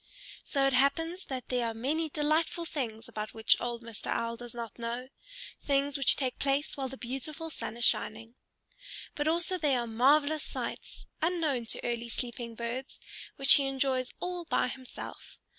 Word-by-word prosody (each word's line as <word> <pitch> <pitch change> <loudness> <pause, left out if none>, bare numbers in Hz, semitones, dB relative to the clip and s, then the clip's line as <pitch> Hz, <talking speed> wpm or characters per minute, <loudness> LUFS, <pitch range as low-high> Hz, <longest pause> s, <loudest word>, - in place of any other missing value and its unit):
So 275 -2 +1
it 275 - +3
happens 325 +8 +2
that 260 -2 -5
there 245 -2 +1
are 225 - -3
many 305 +8 0
delightful 315 +3 +1
things 230 -9 -4
about 215 0 -5
which 220 0 +5
old 240 -1 -3
Mr. 230 -2 -8
Owl 230 0 -1
does 240 0 -10
not 235 -1 -6
know, 240 +2 -4 0.5
things 280 0 +1
which 275 -3 +5
take 260 -3 -2
place 275 +1 0
while 270 -2 -2
the 265 +1 -8
beautiful 275 +6 -5
sun 235 - -5
is 240 - +3
shining. 225 +2 +2 0.8
But 295 +1 -1
also 345 +3 +1
there 285 -5 +2
are - - -3
marvelous 285 +7 +3
sights, - - -5 0.2
unknown 315 -8 +1
to - - +2
early 235 -1 -2
sleeping 235 -1 -4
birds, 240 +3 -5 0.4
which 275 -2 +8
he 280 -1 +6
enjoys 265 -1 0
all 355 -1 -3
by 250 - +1
himself. 255 0 -9
265 Hz, 170 wpm, -31 LUFS, 235-295 Hz, 0.8 s, which